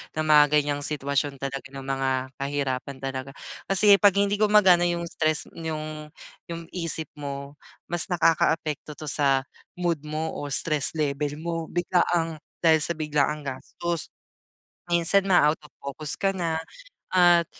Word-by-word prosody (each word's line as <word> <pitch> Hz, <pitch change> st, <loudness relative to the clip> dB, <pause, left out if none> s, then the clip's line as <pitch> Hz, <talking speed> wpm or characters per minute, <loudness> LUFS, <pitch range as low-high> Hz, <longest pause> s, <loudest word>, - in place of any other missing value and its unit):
ng 155 Hz, -, -1 dB
mga 150 Hz, -1 st, +7 dB
ganyang 145 Hz, -1 st, 0 dB
sitwasyon 140 Hz, -1 st, -2 dB
talaga 135 Hz, 0 st, -5 dB
ng 135 Hz, -1 st, -8 dB
mga 135 Hz, 0 st, -2 dB, 0.3 s
kahirapan 140 Hz, -1 st, -4 dB
talaga 135 Hz, 0 st, -5 dB, 0.4 s
kasi 200 Hz, +1 st, +7 dB
'pag 200 Hz, -2 st, +5 dB
hindi 200 Hz, 0 st, +1 dB
gumagana 200 Hz, -5 st, +4 dB
yung 170 Hz, 0 st, -2 dB
stress 155 Hz, -1 st, +2 dB
yung 155 Hz, -1 st, -6 dB, 0.3 s
yung 170 Hz, 0 st, -7 dB
isip 165 Hz, -3 st, 0 dB
mo, 140 Hz, 0 st, -7 dB, 0.3 s
mas 175 Hz, -1 st, +7 dB
nakakaapekto 160 Hz, -2 st, 0 dB
'to 155 Hz, 0 st, -6 dB
sa 135 Hz, -1 st, +3 dB, 0.3 s
mood 175 Hz, -3 st, -2 dB
mo 155 Hz, +1 st, -4 dB
o 145 Hz, -, -6 dB
stress 150 Hz, -3 st, +5 dB
level 145 Hz, -1 st, -2 dB
mo 165 Hz, -1 st, -4 dB
biglaang 175 Hz, -2 st, -1 dB, 0.2 s
dahil 160 Hz, -2 st, +4 dB
sa 170 Hz, -, +5 dB
biglaang 150 Hz, -1 st, -1 dB
gastos. 150 Hz, +4 st, -5 dB, 0.8 s
Minsan 175 Hz, +3 st, +2 dB
maa-out 155 Hz, -4 st, +3 dB
of 150 Hz, -, -16 dB
focus 140 Hz, +1 st, -4 dB
ka 195 Hz, -1 st, 0 dB
na 170 Hz, -4 st, -2 dB, 0.5 s
at 175 Hz, -2 st, +4 dB
155 Hz, 140 wpm, -24 LUFS, 145-170 Hz, 0.8 s, mga